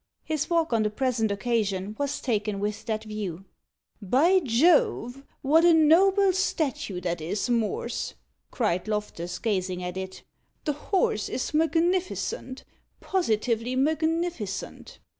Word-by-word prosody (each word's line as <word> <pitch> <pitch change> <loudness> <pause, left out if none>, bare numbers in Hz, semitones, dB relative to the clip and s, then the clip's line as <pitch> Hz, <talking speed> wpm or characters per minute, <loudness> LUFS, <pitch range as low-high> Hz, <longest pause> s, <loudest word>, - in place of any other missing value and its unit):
His 310 -1 -2
walk, 330 -5 +1
on 225 - +3
the 210 - +1
present 230 -1 0
occasion, 205 -2 -1
was 285 +1 -2
taken 210 -4 -1
with 210 +1 -3
that 220 -1 -2
view. 200 -4 -5 0.6
"By 290 - +4
Jove! 270 -2 +2 0.2
what 310 +5 +4
a 345 -1 +6
noble 375 +5 +5
statue 285 - -1
that 175 -2 -2
is, 200 +9 -2
Morse!" 230 -3 -1 0.3
cried 210 -6 -1
Loftus, 205 -5 -3
gazing 185 -5 -2
at 180 +1 -4
it. 190 0 -6 0.4
"The 300 - +1
horse 295 - 0
is 260 - -3
magnificent 335 - 0 0.4
positively 235 - 0
magnificent." 315 - -2
240 Hz, 120 wpm, -26 LUFS, 210-320 Hz, 0.6 s, a